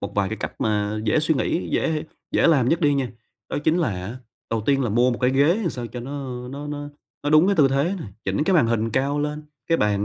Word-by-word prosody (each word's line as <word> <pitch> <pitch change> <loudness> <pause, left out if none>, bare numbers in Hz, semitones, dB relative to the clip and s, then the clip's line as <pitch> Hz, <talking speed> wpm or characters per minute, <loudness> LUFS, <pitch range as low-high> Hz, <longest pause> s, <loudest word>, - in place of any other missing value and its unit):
một 100 - -5
vài 100 -1 +1
cái 110 - -4
cách - - -3
mà 105 0 0
dễ 115 +8 +2
suy 160 +1 +2
nghĩ, 150 +5 -1
dễ - - +1
hê 155 0 -2 0.3
dễ - - +4
làm 140 -7 +4
nhất 165 - +2
đi 145 -2 +3
nha, 135 -3 -1 0.4
đó - - -2
chính 160 +2 +3
là 170 - +2
á, 95 +5 -5 0.3
đầu 115 -2 -1
tiên 135 -1 +3
là - - 0
mua 120 +4 +3
một 120 - -2
cái 125 0 +3
ghế 140 +3 +4
làm 175 - 0
sao 120 -4 -5
cho 120 +2 -7
nó, 135 +4 -7 0.3
ơ, - - -8
nó 140 +2 -6
nó 145 0 -5 0.4
nó 145 - +1
đúng 155 +3 +6
cái 200 -1 +2
tư 140 -3 +5
thế 140 +8 +1
này, 120 - -7 0.2
chỉnh 100 +10 0
cái 190 - +2
màn 155 -9 +5
hình 115 0 0
cao 140 +5 0
lên, 150 +1 -3 0.2
cái 165 - +2
bàn 105 -1 +1
135 Hz, 280 wpm, -23 LUFS, 115-150 Hz, 0.4 s, đúng